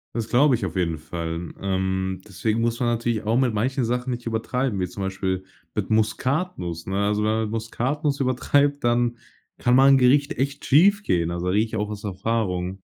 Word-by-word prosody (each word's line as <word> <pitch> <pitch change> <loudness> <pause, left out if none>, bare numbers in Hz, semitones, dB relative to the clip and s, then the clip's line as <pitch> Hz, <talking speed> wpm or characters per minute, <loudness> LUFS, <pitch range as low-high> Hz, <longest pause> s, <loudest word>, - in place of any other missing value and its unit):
Das 115 -2 -2
glaube 130 +2 +4
ich 110 - -3
auf 85 - -5
jeden 85 -3 0
Fall. 85 +1 -5
Ähm 95 -1 -1
deswegen 105 +3 -1
muss 115 +1 0
man 120 - +2
natürlich 115 -1 -1
auch 110 +3 +1
mit 130 -3 +2
manchen 125 +4 0
Sachen 125 +2 -1
nicht 120 0 -5
übertreiben, 115 +1 -1
wie 90 - 0
zum 95 +3 -6
Beispiel 95 -1 -2 0.3
mit 105 -3 -2
Muskatnuss, 110 - -1
ne? 95 +1 -2
Also, 105 0 0
wenn 110 - +2
man 110 -1 0
Muskatnuss 135 +6 -2
übertreibt, 140 +2 +1
dann 120 0 +1 0.4
kann 120 - +2
mal 135 +1 +6
'n 135 - +7
Gericht 140 +3 +3
echt 140 +2 -2
schiefgehen. 150 - +3
Also, 85 +1 -3
da 90 - +1
rede 105 +2 +3
ich 110 - -7
auch 105 0 -2
aus 105 -1 -7
Erfahrung. 95 -2 -2
110 Hz, 195 wpm, -24 LUFS, 95-125 Hz, 0.4 s, n